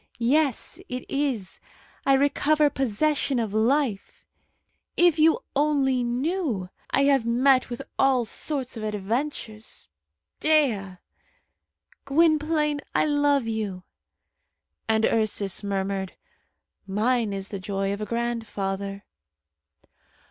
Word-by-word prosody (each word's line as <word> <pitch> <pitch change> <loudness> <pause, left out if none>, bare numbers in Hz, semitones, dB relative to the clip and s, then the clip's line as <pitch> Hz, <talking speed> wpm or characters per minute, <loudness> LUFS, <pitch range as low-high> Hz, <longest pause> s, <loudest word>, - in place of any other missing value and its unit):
Yes, 265 +2 +1
it 250 0 -5
is. 265 -9 -2 0.5
I 275 - +6
recover 290 +2 +3
possession 270 +3 0
of 225 -4 -2
life. 230 -1 0 0.7
If 345 -2 +4
you 320 +1 +4
only 275 -3 +2
knew! 245 - -1 0.2
I 275 - +2
have 275 -3 +4
met 255 +3 +3
with 240 - -5 0.2
all 260 -3 +3
sorts 265 +2 -3
of 225 - -6
adventures. 215 - -4 0.5
Dea!" 235 -12 +2 1.1
"Gwynplaine, 305 0 +2
I - - +3
love 290 -3 +2
you!" 210 -5 -3 1.1
And 220 0 +3
Ursus 210 -3 0
murmured, 195 -1 -2 0.7
"Mine 220 +3 +1
is 195 0 -4
the 200 - -5
joy 195 +1 -2
of 200 - -6
a - - -2
grandfather." 200 -4 -3
240 Hz, 105 wpm, -25 LUFS, 205-285 Hz, 1.1 s, I